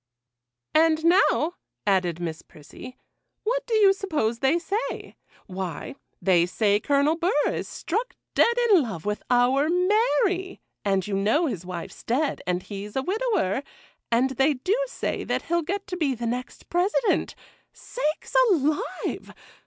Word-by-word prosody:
'And 320 0 +3
now,' 345 -2 +4 0.3
added 180 -4 +1
Miss 165 -2 -4
Prissy, 155 - -13 0.5
'what - - 0
do 460 - 0
you 405 -3 +6
suppose 295 - -1
they 270 +6 +3
say? 395 +6 -4 0.3
Why, 185 -2 -5 0.3
they 175 -3 +3
say 205 +2 +2
Colonel 285 +5 +2
Burr 340 +2 0 0.2
is - - -4
struck 440 +9 -3 0.2
dead 470 +1 +3
in 375 -5 +7
love 200 - -5
with 210 0 -2
our 255 +4 +3
Mary; 380 0 +1 0.2
and 195 -2 +1
you 210 - -4
know 215 - +2
his 185 - -4
wife's 175 -2 -7
dead, 275 +6 0
and 180 0 -1
he's 205 0 -7
a 265 - 0
widower; 385 - 0 0.5
and 250 +3 +3
they 270 +3 +2
do 365 - 0
say - - -3
that - - -2
he'll 340 0 0
get 390 +5 -3
to 360 - -5
be 285 -6 0
the 235 0 -5
next 245 +2 -5
President. 390 +6 +1 0.4
Sakes 320 -7 -4
alive! 305 -5 -1
290 Hz, 145 wpm, -25 LUFS, -, 0.5 s, in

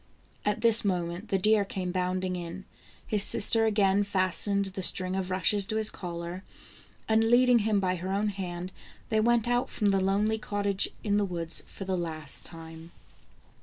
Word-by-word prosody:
At 210 0 -1
this 230 -1 +4
moment 180 0 -2
the 195 - +1
deer 210 +2 +3
came 185 -2 -5
bounding 185 0 -2
in. 175 +2 -7 0.4
His 210 -2 +1
sister 225 +2 +4
again 205 -2 +2
fastened 200 +1 0
the 190 0 -5
string 185 +1 +4
of 190 -1 -3
rushes 190 +2 +2
to 220 - -3
his 220 -1 +4
collar, 175 +1 -7 0.6
and 220 0 +3
leading 245 0 +5
him 215 -1 +1
by 185 -1 -1
her 180 +2 -6
own 205 +2 0
hand, 180 -2 -6 0.4
they 220 - +1
went 235 +1 +2
out 245 +2 0
from 210 -2 0
the 195 -1 +1
lonely 205 +3 0
cottage 205 -2 -1
in 205 -1 +1
the 205 - +2
woods 170 -3 -3
for 195 - -9
the 190 0 -1
last 155 -4 -5
time. 165 0 -11
195 Hz, 175 wpm, -28 LUFS, 180-210 Hz, 0.6 s, leading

